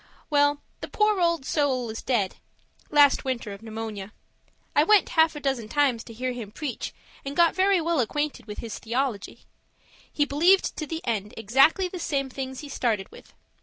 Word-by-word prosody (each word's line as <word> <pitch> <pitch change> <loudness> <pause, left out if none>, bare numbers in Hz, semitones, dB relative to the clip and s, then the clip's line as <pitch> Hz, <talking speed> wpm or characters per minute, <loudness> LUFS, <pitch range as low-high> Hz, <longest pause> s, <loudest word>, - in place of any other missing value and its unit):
Well, 290 0 +3 0.2
the - - -6
poor 425 -2 +2
old 335 -5 +1
soul 260 -7 0
is 225 - -6
dead 210 -7 0 0.5
last 290 -2 +5
winter 245 -5 -3
of 200 - -11
pneumonia. 220 -2 -6 0.6
I 295 - +6
went 415 +4 +4
half 320 -1 +3
a - - -5
dozen 265 -6 -2
times 270 -4 +1
to 230 - -10
hear 255 +3 -3
him 240 -4 -6
preach 275 +1 -5 0.3
and 275 +1 -5
got 340 0 +4
very 380 0 +3
well 335 -1 0
acquainted 260 0 -2
with 210 - -7
his 230 -2 -6
theology. 235 -2 -3 0.7
He 290 - +1
believed 340 +7 +3
to 310 - -4
the 325 +1 -5
end 210 -4 -2
exactly 270 - +3
the 360 0 -7
same 275 -5 -2
things 265 0 -5
he 295 - -8
started 225 -8 -1
with. - - -16
270 Hz, 180 wpm, -26 LUFS, 230-310 Hz, 0.7 s, I